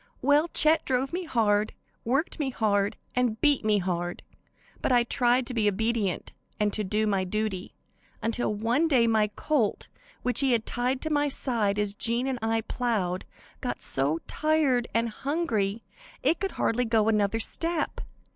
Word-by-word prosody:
"Well, 290 Hz, +4 st, +4 dB
Chet 315 Hz, -1 st, +3 dB
drove 265 Hz, +3 st, -1 dB
me 360 Hz, 0 st, -2 dB
hard, 215 Hz, -6 st, +1 dB, 0.3 s
worked 275 Hz, +9 st, -1 dB
me 285 Hz, -3 st, 0 dB
hard 205 Hz, -5 st, 0 dB, 0.2 s
and 245 Hz, -3 st, 0 dB
beat 290 Hz, -5 st, +3 dB
me 215 Hz, -1 st, +3 dB
hard, 175 Hz, -2 st, -3 dB, 0.6 s
but -, -, 0 dB
I 245 Hz, -1 st, +5 dB
tried 245 Hz, +1 st, +2 dB
to 250 Hz, -, -4 dB
be 215 Hz, -3 st, +2 dB
obedient 215 Hz, -2 st, -1 dB, 0.3 s
and 210 Hz, -1 st, +2 dB
do 210 Hz, +1 st, 0 dB
my 195 Hz, -3 st, +1 dB
duty, 195 Hz, -1 st, -3 dB, 0.4 s
until 230 Hz, +1 st, -1 dB
one 230 Hz, +9 st, +1 dB
day 255 Hz, -7 st, +4 dB
my 220 Hz, -2 st, +3 dB
colt, 280 Hz, -10 st, -1 dB, 0.3 s
which 250 Hz, -2 st, +4 dB
he 270 Hz, -2 st, +3 dB
had 225 Hz, -2 st, 0 dB
tied 250 Hz, +2 st, -1 dB
to 315 Hz, -, -3 dB
my 290 Hz, -1 st, +2 dB
side 230 Hz, -7 st, +1 dB
as 210 Hz, -1 st, 0 dB
Jean 235 Hz, +4 st, 0 dB
and 265 Hz, -2 st, -2 dB
I 225 Hz, 0 st, 0 dB
plowed, 210 Hz, -7 st, -2 dB, 0.3 s
got -, -, -3 dB
so 140 Hz, +4 st, +1 dB
tired 305 Hz, -6 st, +1 dB
and 230 Hz, +1 st, +1 dB
hungry 230 Hz, -5 st, -2 dB, 0.4 s
it 330 Hz, -, +2 dB
could 390 Hz, -2 st, -2 dB
hardly 245 Hz, +2 st, 0 dB
go 220 Hz, -2 st, +2 dB
another 210 Hz, 0 st, +2 dB
step. 330 Hz, +7 st, -1 dB
230 Hz, 165 wpm, -27 LUFS, 210-265 Hz, 0.6 s, I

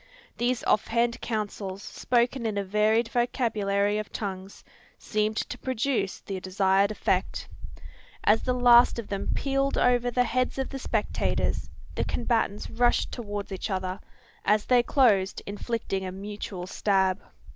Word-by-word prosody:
These 245 Hz, +1 st, 0 dB
off 210 Hz, -, +2 dB
hand 235 Hz, +1 st, 0 dB
counsels, 205 Hz, -3 st, -4 dB
spoken 240 Hz, 0 st, 0 dB
in 210 Hz, -2 st, -2 dB
a 200 Hz, -, 0 dB
varied 215 Hz, +4 st, +2 dB
vocabulary 210 Hz, -5 st, +1 dB
of 215 Hz, -, -6 dB
tongues, 195 Hz, -1 st, -6 dB, 0.3 s
seemed 215 Hz, 0 st, -1 dB
to 250 Hz, -, -3 dB
produce 255 Hz, -5 st, -1 dB
the 195 Hz, -2 st, -5 dB
desired 190 Hz, +1 st, +2 dB
effect. 215 Hz, -, -1 dB, 0.8 s
As 215 Hz, +2 st, +4 dB
the 250 Hz, -, 0 dB
last 245 Hz, -1 st, +6 dB
of 235 Hz, -, -6 dB
them 200 Hz, -1 st, -3 dB
pealed 275 Hz, 0 st, 0 dB
over 245 Hz, 0 st, +3 dB
the 250 Hz, +1 st, +2 dB
heads 255 Hz, +2 st, -1 dB
of 265 Hz, -, -2 dB
the 270 Hz, -, -5 dB
spectators, 220 Hz, -4 st, -1 dB, 0.2 s
the -, -, -1 dB
combatants 225 Hz, -3 st, -1 dB
rushed 240 Hz, +1 st, +1 dB
towards 205 Hz, -4 st, -5 dB
each 190 Hz, +3 st, -4 dB
other, 185 Hz, -1 st, -2 dB, 0.4 s
as 210 Hz, 0 st, +2 dB
they 250 Hz, -1 st, +5 dB
closed 215 Hz, -8 st, +2 dB
inflicting 205 Hz, -1 st, -3 dB
a 185 Hz, -, -4 dB
mutual 195 Hz, -1 st, -6 dB
stab. 190 Hz, 0 st, +1 dB
215 Hz, 145 wpm, -27 LUFS, 200-240 Hz, 0.8 s, last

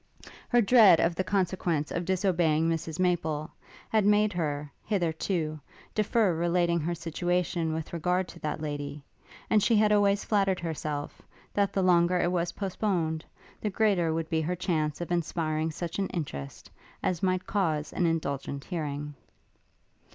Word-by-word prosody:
Her 240 Hz, -1 st, +5 dB
dread 205 Hz, -6 st, +7 dB
of 170 Hz, -, +2 dB
the 185 Hz, -, -1 dB
consequence 180 Hz, -6 st, 0 dB
of 170 Hz, 0 st, -2 dB
disobeying 175 Hz, -4 st, +2 dB
Mrs 165 Hz, 0 st, -2 dB
Maple, 160 Hz, -4 st, 0 dB, 0.4 s
had 220 Hz, -2 st, +2 dB
made 210 Hz, 0 st, +3 dB
her, 150 Hz, -4 st, -2 dB
hitherto, 165 Hz, -4 st, -1 dB, 0.3 s
defer 215 Hz, -2 st, +2 dB
relating 170 Hz, +1 st, +1 dB
her 170 Hz, +2 st, -2 dB
situation 170 Hz, 0 st, -1 dB
with 160 Hz, +1 st, -4 dB
regard 180 Hz, +2 st, 0 dB
to -, -, -11 dB
that 155 Hz, -2 st, -3 dB
lady; 145 Hz, -1 st, -5 dB, 0.4 s
and 215 Hz, -, +3 dB
she 230 Hz, -, +3 dB
had 210 Hz, 0 st, +4 dB
always 205 Hz, -1 st, +3 dB
flattered 195 Hz, -3 st, +1 dB
herself, 155 Hz, -3 st, -4 dB, 0.3 s
that 200 Hz, -1 st, +1 dB
the 195 Hz, -1 st, 0 dB
longer 180 Hz, 0 st, +4 dB
it 175 Hz, -, +1 dB
was 175 Hz, -1 st, -1 dB
postponed, 180 Hz, -5 st, -1 dB, 0.4 s
the 210 Hz, -, -1 dB
greater 190 Hz, -5 st, +2 dB
would 160 Hz, 0 st, -2 dB
be 160 Hz, -1 st, +2 dB
her 175 Hz, +3 st, -1 dB
chance 165 Hz, -4 st, -1 dB
of 175 Hz, -, -5 dB
inspiring 160 Hz, -2 st, -1 dB
such 170 Hz, +3 st, -5 dB
an 195 Hz, -, +1 dB
interest 70 Hz, -, -6 dB, 0.3 s
as 175 Hz, -3 st, 0 dB
might 185 Hz, -1 st, 0 dB
cause 160 Hz, -7 st, -1 dB
an 175 Hz, -, +1 dB
indulgent 140 Hz, -3 st, -2 dB
hearing. 150 Hz, -4 st, -4 dB
170 Hz, 150 wpm, -28 LUFS, 155-190 Hz, 0.4 s, dread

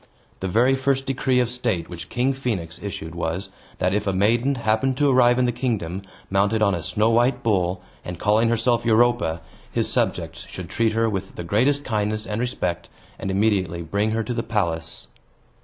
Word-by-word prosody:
The 95 Hz, -, -2 dB
very 120 Hz, +8 st, +3 dB
first 135 Hz, 0 st, 0 dB
decree 130 Hz, -1 st, +1 dB
of 125 Hz, -, +2 dB
state 115 Hz, -8 st, -2 dB
which 85 Hz, -1 st, -8 dB
King 125 Hz, +3 st, +1 dB
Phoenix 100 Hz, -11 st, -3 dB
issued 85 Hz, -5 st, -6 dB
was, 85 Hz, +3 st, -3 dB, 0.3 s
that, 90 Hz, +1 st, +1 dB
if 105 Hz, 0 st, 0 dB
a 100 Hz, -, +1 dB
maiden 115 Hz, +8 st, +2 dB
happened 120 Hz, +3 st, +1 dB
to 145 Hz, -, +3 dB
arrive 125 Hz, -1 st, +5 dB
in 125 Hz, -, +3 dB
the 120 Hz, -, +2 dB
kingdom, 110 Hz, -8 st, -2 dB, 0.3 s
mounted 100 Hz, +3 st, +2 dB
on 100 Hz, -2 st, +3 dB
a 85 Hz, -, -2 dB
snow 105 Hz, +8 st, +2 dB
white 120 Hz, +2 st, +2 dB
bull, 95 Hz, -4 st, +1 dB, 0.2 s
and 90 Hz, -1 st, -6 dB
calling 110 Hz, +4 st, +3 dB
herself 115 Hz, 0 st, +2 dB
Europa, 115 Hz, -8 st, +2 dB, 0.3 s
his -, -, 0 dB
subjects -, -, -1 dB
should 90 Hz, -3 st, -8 dB
treat 115 Hz, -1 st, +1 dB
her 115 Hz, +1 st, +2 dB
with 95 Hz, -3 st, -4 dB
the 85 Hz, -, -5 dB
greatest 130 Hz, +11 st, +1 dB
kindness 110 Hz, 0 st, -1 dB
and 105 Hz, 0 st, -3 dB
respect, 90 Hz, -9 st, -2 dB, 0.3 s
and 95 Hz, -, -3 dB
immediately 95 Hz, -4 st, +1 dB
bring 100 Hz, +6 st, 0 dB
her 110 Hz, +1 st, 0 dB
to 120 Hz, -, -3 dB
the 115 Hz, -, -1 dB
palace. 85 Hz, -8 st, -1 dB
110 Hz, 190 wpm, -23 LUFS, 95-120 Hz, 0.3 s, arrive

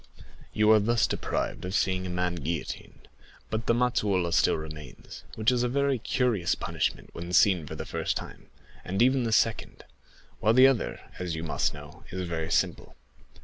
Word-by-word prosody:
You 105 Hz, 0 st, +3 dB
are 110 Hz, -, +7 dB
thus 115 Hz, +3 st, +2 dB
deprived -, -, -3 dB
of 90 Hz, +2 st, -3 dB
seeing 95 Hz, -1 st, 0 dB
a -, -, -5 dB
man 90 Hz, 0 st, -1 dB
guillotined; 85 Hz, -2 st, -5 dB, 0.4 s
but 110 Hz, 0 st, -3 dB
the -, -, +4 dB
mazzolata 100 Hz, -8 st, +1 dB
still -, -, +4 dB
remains, 75 Hz, -6 st, -9 dB
which 110 Hz, +2 st, +2 dB
is 125 Hz, -1 st, +1 dB
a 125 Hz, -, +1 dB
very 140 Hz, 0 st, +1 dB
curious 115 Hz, -7 st, 0 dB
punishment -, -, -3 dB
when 85 Hz, +1 st, -7 dB
seen 90 Hz, -4 st, +4 dB
for -, -, -6 dB
the -, -, -6 dB
first -, -, -2 dB
time, -, -, -9 dB, 0.4 s
and 95 Hz, +2 st, -3 dB
even 130 Hz, 0 st, +3 dB
the 115 Hz, -, -1 dB
second, 115 Hz, 0 st, 0 dB, 0.6 s
while 110 Hz, -, +3 dB
the 130 Hz, +1 st, +8 dB
other, 135 Hz, -4 st, +1 dB, 0.2 s
as 90 Hz, -3 st, -3 dB
you 80 Hz, -, -5 dB
must 80 Hz, -2 st, -1 dB
know, 75 Hz, -1 st, -12 dB
is 90 Hz, -1 st, -4 dB
very 80 Hz, -1 st, -3 dB
simple. -, -, -1 dB
95 Hz, 180 wpm, -27 LUFS, 85-120 Hz, 0.6 s, the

